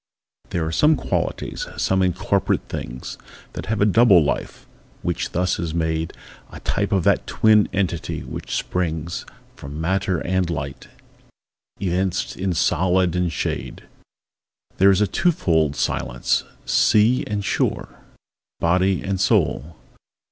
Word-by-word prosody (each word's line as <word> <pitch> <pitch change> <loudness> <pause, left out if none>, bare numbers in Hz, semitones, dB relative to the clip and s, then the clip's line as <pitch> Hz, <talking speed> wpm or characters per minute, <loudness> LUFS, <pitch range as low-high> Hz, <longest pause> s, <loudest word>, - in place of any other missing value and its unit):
There 85 -2 -1
are 80 - -2
some 150 - +4
qualitiesâsome 95 -6 -1
incorporate 95 +2 0
things, 60 +1 -6 0.3
That - - -6
have 105 0 -1
a - - +5
double 105 -4 +6
life, 75 - -3 0.4
which - - -2
thus 90 0 0
is 85 -2 -3
made 80 -1 -1 0.4
A - - -9
type 100 +1 -1
of 95 -4 +2
that 100 +3 +2
twin 110 -1 +4
entity 90 -4 -2
which - - -5
springs 85 -1 -2 0.3
From 70 +2 -8
matter 95 +2 0
and 95 -1 0
light, 70 -5 -5 0.9
evinced 95 -1 -1
in 95 0 -1
solid 90 +1 +2
and 90 -1 0
shade. 70 - -4 0.9
There 95 +1 +6
is 100 +1 +4
a 105 - +3
two 175 - +2
fold 80 - +1
Silenceâsea 105 - +1
and 105 -1 -2
shoreâ - - 0 0.7
Body 90 +2 +2
and 95 -1 -2
soul. 80 +2 +1
90 Hz, 125 wpm, -22 LUFS, 80-100 Hz, 0.9 s, double